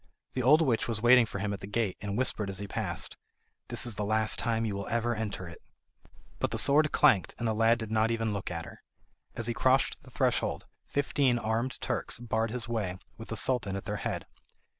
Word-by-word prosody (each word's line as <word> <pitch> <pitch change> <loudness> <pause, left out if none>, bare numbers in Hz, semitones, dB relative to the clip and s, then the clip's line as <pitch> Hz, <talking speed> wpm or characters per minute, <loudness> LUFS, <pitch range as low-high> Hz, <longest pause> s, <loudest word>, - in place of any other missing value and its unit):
The 130 - -1
old 150 +6 +6
witch 120 -7 +1
was 115 -2 -1
waiting 120 -1 +7
for 100 - -6
him 100 +1 -2
at 100 - -5
the 95 - -8
gate, 105 -2 -1
and 100 0 -3
whispered 110 -5 0
as 95 - -5
he 100 +1 -5
passed: - - -4 0.5
"This - - +1
is 115 -4 -3
the 105 - -1
last 110 +1 +1
time 115 -1 0
you 105 -3 -2
will 100 0 -5
ever 115 +1 0
enter 105 -5 -4
it." 85 - -11 0.8
But - - 0
the - - -3
sword 150 +2 +5
clanked, 130 -11 +3
and 120 - -2
the 110 - +1
lad 115 +2 +3
did 110 -2 -6
not 110 0 +2
even 115 -2 -1
look 100 -2 -4
at 85 -1 -5
her. - - -12 0.5
As 115 - -3
he 120 - 0
crossed 130 +3 +2
the - - -15
threshold - - 0 0.2
fifteen 140 -3 +1
armed 115 +3 -1
Turks - - -2
barred 115 -1 -1
his 120 0 0
way, 105 -6 -2 0.2
with 115 - -8
the 115 - -5
Sultan 110 -7 +2
at 100 - -5
their - - -3
head. - - -3
115 Hz, 225 wpm, -29 LUFS, 105-120 Hz, 0.8 s, waiting